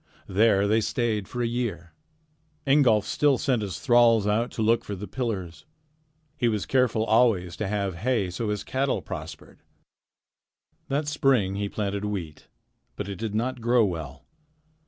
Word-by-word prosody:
There 100 0 +3
they 110 +2 +3
stayed 110 -3 -1
for 120 -1 -3
a - - +1
year. 110 -8 -4 0.7
Ingolf 135 -7 +4
still 145 -3 +2
sent 130 -5 0
his 100 -3 -4
thralls 120 -4 +4
out 110 +4 +1
to 110 - -2
look 115 +1 +2
for 100 - -5
the 100 +2 -7
pillars. 95 - -4 0.7
He 125 -5 0
was 105 -3 -2
careful 125 -4 +2
always 110 -7 +2
to 105 - -2
have 100 -1 -1
hay, 110 -2 0
so 105 +5 -3
his 105 -1 -2
cattle 135 +4 -1
prospered. - - -8 1.3
That 145 +2 -1
spring 135 -10 +2
he 100 0 -2
planted 100 -1 -3
wheat, 95 -7 -5 0.5
but 105 - -5
it 100 -2 -5
did 110 0 -4
not 125 +2 -2
grow 120 0 +3
well. 80 -7 -6
110 Hz, 155 wpm, -26 LUFS, 100-120 Hz, 1.3 s, Ingolf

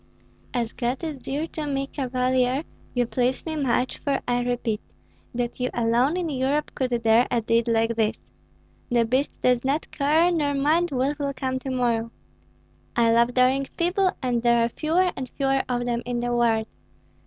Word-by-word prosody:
"As 235 -3 -2
God 245 +5 -2
is 310 -4 -4
dear 290 +4 -2
to 305 -2 -5
me, 275 -1 -1
Cavalier, 255 0 0 0.3
you 245 0 +2
please 250 +2 0
me 320 -1 -3
much; 255 -3 0
for 275 -2 0
I 245 0 +1
repeat 240 -3 -1 0.5
that 240 0 -2
you 250 0 0
alone 240 +7 +2
in 355 -2 -1
Europe 280 +1 0
could 245 -3 -1
dare 225 +2 +5
a 240 - +1
deed 230 +1 +1
like 230 0 +2
this. 220 -1 0 0.7
The 240 -2 +3
beast 260 +5 -1
does 250 -1 +3
not 280 +4 -1
care, 310 +5 +3
nor 295 -4 0
mind 315 +5 +2
what 275 +3 -1
will 280 -1 -1
come 260 -1 -2
to 265 - -6
morrow. 235 -3 0 0.9
I 230 -1 +4
love 235 +1 +3
daring 260 +2 +3
people, 370 +3 +2
and 245 -2 +1
there 235 -1 +4
are - - -1
fewer 340 +8 +1
and 260 -1 -5
fewer 270 0 +1
of 245 -1 -1
them 240 -1 -1
in 245 0 -2
the 240 0 -1
world. 230 -2 +2
255 Hz, 180 wpm, -25 LUFS, 240-280 Hz, 0.9 s, dare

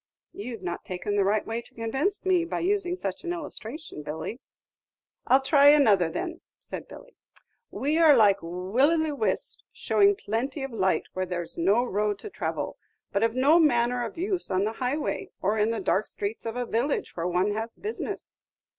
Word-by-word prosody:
"You've 225 -1 -7
not 175 -1 -4
taken 185 +3 -3
the 200 - +3
right 205 +2 +1
way 225 +1 -3
to - - -20
convince 270 - -1
me, 365 -2 +3
by 335 - -3
using 365 -1 +1
such 195 - -5
an 345 - -3
illustration, 300 - -7
Billy." 160 - -5 0.9
"I 255 - +6
'll - - -4
try 280 +1 +5
another, 215 - +6
then," 345 - -4 0.2
said - - -7
Billy. - - -13 0.5
"We 300 +4 0
are 310 -5 +7
like 200 -3 +5
Willy 225 - +1
the 295 - -3
Whisps, 225 -6 -1
showing 405 0 +3
plenty 260 - -3
of 270 -2 -5
light 190 -4 +1
where 185 0 -2
there's 175 -2 -2
no 200 +8 +3
road 210 -3 0
to 420 - -9
travel, - - -3 0.3
but 200 - 0
of 230 +1 +1
no 285 +6 +5
manner 245 -5 +3
of 230 - -6
use 370 +1 -2
on 185 +1 +1
the 215 +2 -1
highway, 285 - -2
or 210 +3 0
in 210 +1 +3
the 230 -1 -1
dark 205 +3 +1
streets 210 +3 -4
of 225 - -4
a 245 0 -2
village 240 +6 -1
where 170 0 -2
one 180 +3 +1
has 225 +2 -4
business." 430 +2 -5
235 Hz, 190 wpm, -27 LUFS, 200-305 Hz, 0.9 s, are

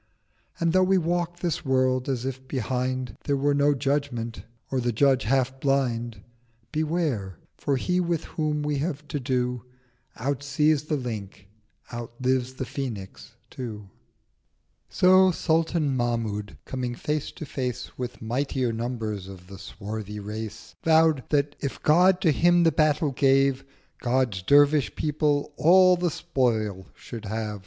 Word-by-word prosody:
And 170 0 +1
though 185 - +5
we 190 +1 +4
walk 175 0 -1
this 170 -4 -1
World 130 0 +1
as 130 -2 -2
if 130 0 -5
behind 130 0 -2
1000 105 - -13
There 140 -1 +1
were 145 +1 +2
no 145 0 +3
Judgement, 135 -4 -2 0.3
or 135 - +1
the 120 0 0
Judge 130 +2 +3
half 130 +2 +1
blind, 120 -6 0 0.5
Beware, 150 - -1 0.2
for 140 -2 -1
He 180 +7 0
with 170 -2 0
whom 150 -1 -2
we 145 -1 -1
have 150 -1 -3
to 145 - -2
do 125 -2 -1 0.5
Outsees 145 +3 +1
the 155 - 0
Lynx, 110 -8 -5 0.5
outlives 125 +2 -2
the 130 - -4
Phoenix 120 -7 -6 0.2
too— 105 -6 -7 1.0
So 185 +1 +5
Sultan 160 -4 +1
Mahmud, 115 -4 -2
coming 125 -2 -3
Face 150 +3 -2
to 155 - -7
Face 125 -3 -4
With 125 -2 -6
mightier 125 +1 -1
numbrs 110 -4 -3
of 95 -2 -11
the 95 +1 -11
swarthy 105 +1 -6
Race, 105 +1 -7
Vow'd 160 -4 +4
that 145 -1 +1
if 140 - -4
God 180 +4 +5
to 165 -5 +4
him 175 +3 +4
the 165 - +5
battle 155 -1 +2
gave, 135 0 +3 0.4
God's 120 -6 0
Dervish 145 +6 +4
People 150 -1 0
all 185 +2 +6
the 175 0 0
Spoil 115 - -1
should 115 -2 -9
have. 105 0 -3
135 Hz, 145 wpm, -26 LUFS, 120-150 Hz, 1.0 s, all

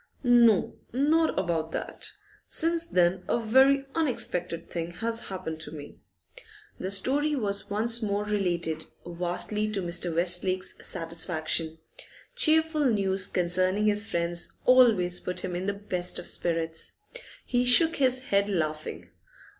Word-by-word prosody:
'No, 235 -4 +3
not 310 +5 +1
about 165 -3 -2
that. - - -5 0.4
Since 335 0 0
then 180 - +1
a 235 - +1
very 265 +5 +3
unexpected 180 - -2
thing 170 -1 -4
has 230 +5 -3
happened 170 -5 -6
to 150 - -7
me.' 145 -2 -11 0.8
The 185 - -4
story 280 +10 +1
was 205 -6 -1
once 225 +3 +1
more 205 -1 -1
related, 175 -6 -2 0.2
vastly 180 +5 -1
to 200 - -1
Mr. 175 -1 +1
Westlake's 180 +2 +2
satisfaction. 165 -1 -1 0.6
Cheerful 320 -7 +2
news 195 -5 +2
concerning 185 +3 +1
his 210 +1 +3
friends 170 0 0
always 225 -9 +4
put 180 0 -3
him 180 - -4
in 185 +2 -4
the 200 - 0
best 185 -3 -2
of - - -6
spirits. 165 -1 -2 0.5
He 245 -1 0
shook 320 +7 +3
his 260 0 +1
head, 200 +1 +2
laughing. 155 -5 -4
195 Hz, 130 wpm, -27 LUFS, 175-245 Hz, 0.8 s, always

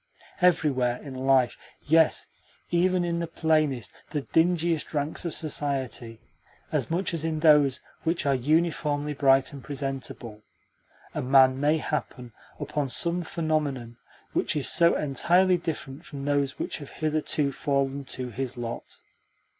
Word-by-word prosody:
Everywhere 135 -9 +2
in 140 -3 -8
life 130 -1 +2 0.3
yes, 160 +1 +3 0.5
even 180 +1 +2
in 170 -1 -1
the 170 - -2
plainest, 155 -7 0 0.2
the 150 - -2
dingiest 165 -1 +1
ranks 150 +4 -1
of 170 - -2
society, 135 -6 -2 0.5
as - - -1
much 175 +2 -1
as 165 -2 -2
in 160 -1 -2
those 150 -4 +5 0.2
which 165 -1 0
are 140 - +3
uniformly 150 +1 0
bright 135 -1 +3
and 140 - -9
presentable 135 -6 -5 0.7
a - - -2
man 130 0 +5
may 150 +3 +3
happen 125 -6 -4 0.3
upon 145 -1 -2
some 170 +6 +1
phenomenon 150 -8 -2 0.4
which - - 0
is 145 - 0
so 170 0 +4
entirely 175 +6 +3
different 160 -3 -5
from 140 -4 -8
those 140 -1 0
which - - -3
have 145 - -9
hitherto 155 -2 -1
fallen 140 0 -1
to 130 -1 -5
his 130 +1 -4
lot. 120 -1 -6
145 Hz, 140 wpm, -26 LUFS, 135-160 Hz, 0.7 s, those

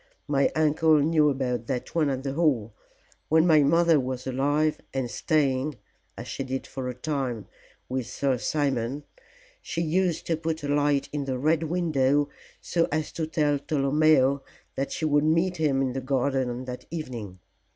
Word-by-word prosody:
My 140 -2 +2
uncle 155 0 +4
knew 150 0 +3
about 125 -4 -2
that 125 -2 -3
one 155 -4 +2
at 135 -1 -2
the 135 -1 -3
Hall. 135 -9 +1 0.6
When 160 +1 +5
my 155 -3 +6
mother 165 +2 +4
was 130 -1 -4
alive, 145 +4 0
and 130 -3 -2
staying 145 -2 0 0.4
as - - -7
she - - -4
did 130 0 -4
for 130 -1 -5
a 125 - -5
time 125 - -3 0.4
with 130 -2 -3
Sir 135 -3 -1
Simon, 140 -1 -1 0.6
she 165 0 -3
used 175 +1 0
to 165 - +1
put 160 -1 -3
a - - -2
light 145 -1 +1
in 145 -2 -2
the 130 -2 -2
Red 155 +4 +2
Window 145 -4 +1 0.3
so 170 -1 +1
as 155 0 -1
to 160 -2 -3
tell 150 -3 +1
Tolomeo 140 -1 +3 0.3
that 135 +1 -3
she 160 - -2
would 145 -1 +3
meet 165 +4 +2
him 140 -4 +1
in 130 -2 -1
the 135 - -3
garden 130 0 0
on 125 +1 -5
that 125 0 -7
evening. 120 - -6
145 Hz, 170 wpm, -26 LUFS, 130-155 Hz, 0.6 s, my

